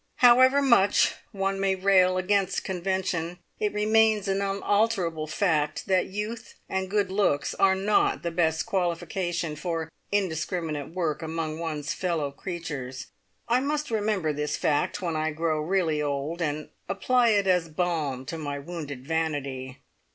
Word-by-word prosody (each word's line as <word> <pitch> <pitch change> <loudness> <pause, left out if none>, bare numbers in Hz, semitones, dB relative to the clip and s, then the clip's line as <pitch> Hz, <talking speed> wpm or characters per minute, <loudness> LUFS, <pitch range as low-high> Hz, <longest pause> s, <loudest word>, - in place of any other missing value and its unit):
However 255 +3 +6
much 205 -7 +4 0.2
one 195 0 -1
may 195 -1 +2
rail 185 -1 +4
against 195 +1 +1
convention, 180 -2 -2 0.2
it 210 -1 0
remains 215 0 +3
an 195 0 0
unalterable 195 -5 0
fact 155 -3 0
that 190 -1 +2
youth 210 +4 -5
and 190 0 -2
good 200 -2 +1
looks 190 -8 +1
are 190 -1 +3
not 200 +2 +1
the 170 - -1
best 160 -2 +1
qualification 175 -2 -1
for 165 0 -3 0.2
indiscriminate 165 -5 -1
work 165 -4 -1
among 160 -1 -3
one's 155 -3 -3
fellow 165 -6 -1
creatures. 140 -6 -6 0.4
I 240 +1 +3
must 295 0 -2
remember 205 -7 0
this 150 +1 -2
fact 150 +4 0
when 170 -2 -1
I 155 0 0
grow 160 0 0
really 160 -2 +1
old, 145 +4 -2
and 150 -1 -2 0.2
apply 240 +5 +2
it 205 -2 +3
as 180 -3 +2
balm 155 -6 -1
to 165 - -5
my 145 -2 -3
wounded 145 -4 -7
vanity. 140 -5 -2
175 Hz, 145 wpm, -27 LUFS, 155-195 Hz, 0.4 s, However